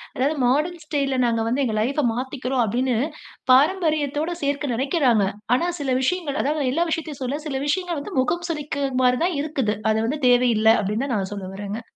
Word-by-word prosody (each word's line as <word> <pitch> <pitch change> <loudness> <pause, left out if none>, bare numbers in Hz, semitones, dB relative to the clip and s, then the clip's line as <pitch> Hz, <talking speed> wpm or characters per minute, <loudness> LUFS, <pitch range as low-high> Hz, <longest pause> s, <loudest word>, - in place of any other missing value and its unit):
அதாவது 280 +5 +1
மாடர்ன் 305 +8 +1
ஸ்டைல்ல 280 -3 -1
நாங்க 230 -1 +1
வந்து 255 +5 0
எங்கள் 220 -4 0
லைஃப் 275 +7 -1
மாத்திக்குறோம். 260 +1 -2
அப்பிடின்னு 245 +3 0 0.5
பாரம்பரியத்தோடு 305 +1 +2
சேர்க்க 285 -2 -1
நினைக்குறாங்க. 255 - +2 0.3
ஆனா, 340 +7 0
சில 275 -3 -1
விஷயங்கள் 300 0 -1
அதாவது 290 -2 0
எல்லா 335 +6 +1
விஷயத்தையும் 310 -4 -4
சொல்ல, 275 +4 -2
சில 270 -3 -2
விஷயங்கள் 345 0 -1
வந்து 370 +3 -6
முகம் 345 +7 0
சுழிக்க 285 -3 -2 0.2
மாரி 250 0 +3
தான் 350 -5 -1
இருக்குது. 270 -8 -1 0.2
அது 215 - +1
வந்து 290 +5 -2
தேவையில்ல 240 -3 +4
அப்பிடின்னு 210 +6 -1
தான் 260 -4 -1
நான் 195 -1 -3
சொல்ல 195 -2 -6
வரேங்க. 205 +3 -5
275 Hz, 175 wpm, -23 LUFS, 245-305 Hz, 0.5 s, தேவையில்ல